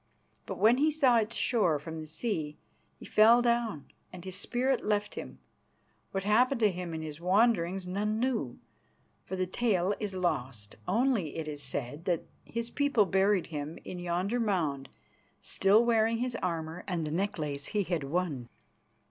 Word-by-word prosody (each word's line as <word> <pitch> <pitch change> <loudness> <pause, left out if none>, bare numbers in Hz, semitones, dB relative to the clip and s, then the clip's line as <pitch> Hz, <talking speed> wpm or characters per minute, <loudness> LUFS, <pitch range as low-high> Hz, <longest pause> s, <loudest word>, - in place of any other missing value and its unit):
But - - -4
when 230 +3 +5
he 300 +3 +3
saw 275 -6 +4
its 225 0 0
shore 200 -11 +2
from 160 +2 -7
the 155 - -8
sea 160 -3 -3 0.4
he - - -12
fell 225 +3 +6
down 235 - 0 0.3
and 180 0 -10
his 185 -1 -5
spirit 250 +6 0
left 210 -1 0
him. - - -7 0.7
What 195 -1 -3
happened 240 +5 +3
to 210 -2 +5
him 175 -2 -5
in 160 - -4
his 155 +1 -7
wanderings 190 -1 +2
none 210 +4 -1
know, 235 - -1 0.7
for 190 - -4
the 185 0 0
tale 190 -1 +1
is 205 -3 -4
lost. 125 - -2
Only 225 - +1
it 160 -1 -4
is 145 -1 -4
said 140 +3 -4
that 175 -3 0 0.2
his 235 0 -4
people 285 -7 +3
buried 195 -1 +2
him 150 +2 -4
in 180 - -6
yonder 180 +7 -1
mound 160 - -1 0.5
still 205 +4 +3
wearing 230 -1 +3
his 245 0 -2
armour 165 -1 -3
and 175 -5 -1
the 150 - -4
necklace 155 -6 -2
he 210 -1 0
had 175 -5 -2
won. 140 -5 -2
190 Hz, 165 wpm, -30 LUFS, 160-225 Hz, 0.7 s, fell